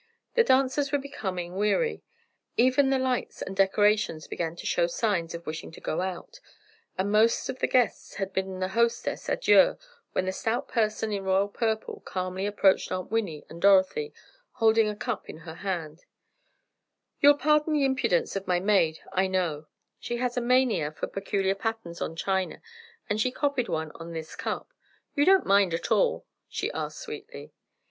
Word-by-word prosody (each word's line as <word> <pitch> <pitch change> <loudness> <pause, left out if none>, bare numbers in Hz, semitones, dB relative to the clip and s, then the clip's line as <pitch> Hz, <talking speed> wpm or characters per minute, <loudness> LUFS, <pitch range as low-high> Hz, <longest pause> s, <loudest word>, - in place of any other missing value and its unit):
The 470 - +5
dancers 270 - +2
were 290 - +3
becoming 190 -11 -5
weary, 210 - +1 0.6
even 260 +3 +4
the 270 - +3
lights 260 -1 -2
and 195 - -6
decorations 195 -4 +2
began 165 -1 -3
to - - -9
show 170 -1 +2
signs 170 -3 -1
of 170 0 -9
wishing 155 0 -5
to - - -11
go 155 - -2
out, 190 - -5 0.6
and 195 +2 0
most 220 +2 +3
of 260 - -4
the - - +1
guests 250 -3 +1
had 195 -1 -4
bidden 190 -1 -2
the 185 0 -1
hostesses 235 +3 0
adieu - - +4 0.4
when 185 - 0
the 185 - 0
stout 225 +5 -2
person 215 -2 0
in 200 -1 -2
royal 190 +1 +2
purple 220 +1 -2
calmly 185 +1 -3
approached 200 -2 +2
Aunt 185 +1 -4
Winnie 200 -10 -2
and 170 +1 -11
Dorothy, 200 - +4 0.4
holding 225 -2 +3
a 210 - -4
cup 230 0 -4
in - - -7
her 160 0 -9
hand: 170 -3 -5 1.1
"You'll 290 0 +7
pardon 300 +1 +2
the 290 -2 +3
impudence 255 -12 +1
of 195 -1 -4
my 180 -1 +2
maid, 180 -5 +2
I 190 +1 +2
know, 170 -5 -1 0.3
she 240 - -3
has 245 0 -1
a 250 - 0
mania 240 - +2
for 155 - -4
peculiar 195 -1 -1
patterns 195 -4 -4
on 165 - -3
china, 190 +1 -2 0.4
and 210 +1 0
she 255 - +2
copied 265 -3 -1
one 160 -2 -2
on 165 0 -9
this 160 -1 -6
cup. - - -4 0.4
You 290 -1 +2
don't 385 0 +5
mind 195 -3 +4
at - - -5
all?" - - +2 0.2
she - - -2
asked - - -4
sweetly. 445 -1 -9
205 Hz, 175 wpm, -27 LUFS, 185-255 Hz, 1.1 s, You'll